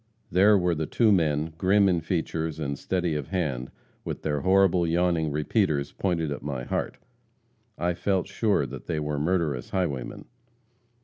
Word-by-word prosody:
There 100 +4 +5
were 90 -2 +1
the 80 -1 -2
two 115 -3 +3
men, 80 -4 +1
grim 100 +2 +4
in 90 -3 +2
features 80 -2 -2
and 70 -2 -2
steady 90 -3 -1
of 75 -3 -3
hand, 70 -9 -2 0.3
with - - -5
their 75 -2 -1
horrible, 95 -2 +3
yawning 85 -1 +1
repeaters 75 -1 0
pointed 85 -5 -1
at 70 - -4
my 70 -4 -4
heart. - - -3 0.8
I 90 0 0
felt 95 +1 0
sure 100 -5 +1
they 70 +4 -4
were 75 -1 -2
murderous 75 -6 0
highwaymen. 75 -10 -3
80 Hz, 150 wpm, -26 LUFS, 75-95 Hz, 0.8 s, There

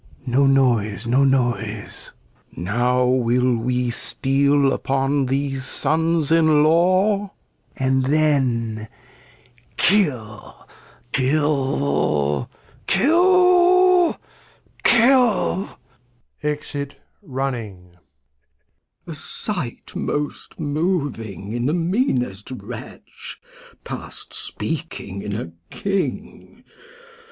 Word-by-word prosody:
no 135 +2 +2
Noise, 120 -6 +2
no 125 +4 +3
Noise. 120 -6 -1 0.5
^Now 125 +7 +1
will 125 +1 +2
we 125 +1 -1
steal 140 +3 +2
upon 135 0 0
these 135 0 -1
Sons 160 +2 0
in 155 -2 +4
Law, 185 +5 +2 0.4
and 130 0 +1
then 125 -7 +1 0.9
Kill, 130 - +1 0.4
kiU, 75 - 0 0.5
kill, 360 +2 +4 0.7
kiU! 235 -5 +3 0.8
\E%it 145 -1 -4 0.3
Running. 120 -9 -5
Glost. - - -27 1.1
A 165 - -7 0.4
Sight 140 -11 -7
most 145 +4 -4
moving 145 - -3
in 120 +1 -1
the 155 - +1
meanest 165 - -1
Wretch, 130 - -10 0.4
Past - - -8
speaking 165 - -5
in 105 0 -4
a 105 -6 -5 0.2
King. 195 -1 -4
135 Hz, 75 wpm, -21 LUFS, 120-165 Hz, 1.1 s, in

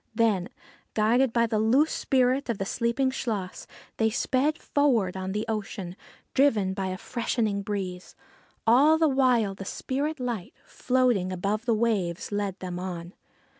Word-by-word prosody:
Then, 210 -5 +2 0.5
guided 230 +4 +3
by 235 0 +3
the 220 -2 0
loosed 255 +8 +3
spirit 260 0 +1
of 230 - 0
the 195 - -3
sleeping 235 +5 0
Chluas, 210 -8 -4 0.3
they 220 -1 +3
sped 270 +7 0
forward 240 - +1
on 190 0 -4
the 210 +2 -2
ocean, 195 -4 -4 0.4
driven 220 -9 +3
by 190 -1 -3
a 185 0 -3
freshening 220 -2 -1
breeze. 190 -3 -5 0.5
All 275 +8 +6
the 320 0 +3
while 250 -7 +2
the 195 - -8
spirit 280 +9 -3
light, 240 -7 -4
floating 250 -8 +1
above 200 +5 -2
the 230 - +3
waves, 210 -7 -1
led 205 -2 -2
them 180 -1 -4
on. 175 -1 -6
220 Hz, 150 wpm, -27 LUFS, 195-255 Hz, 0.5 s, All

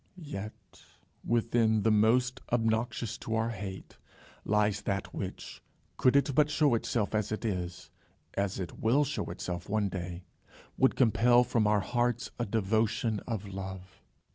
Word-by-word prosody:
Yet 110 - -8 0.4
within 115 -2 +2
the 110 - +4
most 125 +5 +3
obnoxious 115 -1 0
to 115 - -3
our 110 +1 +1
hate, 95 -3 -7 0.5
lies 105 -1 +1
that 100 -1 -3
which, - - -6 0.4
could 130 - +4
it 140 0 +3
but 150 +2 +4
show 145 -2 +3
itself 115 -2 0
as 105 -2 0
it 110 +2 -3
is, 90 -4 -4 0.4
and 100 - +1
as 95 - -5
it 90 - -6
will 125 +7 +3
show 145 +1 -2
itself 90 +1 -5
one 105 -1 +1
day, 90 -1 -5 0.5
would 130 - +3
compel 120 0 +5
from 115 -3 +1
our 105 -1 +3
hearts 120 +3 -1
a 120 - -1
devotion 110 +1 +1
of 110 -4 -3
love. 95 -1 -8
110 Hz, 150 wpm, -30 LUFS, 100-120 Hz, 0.5 s, compel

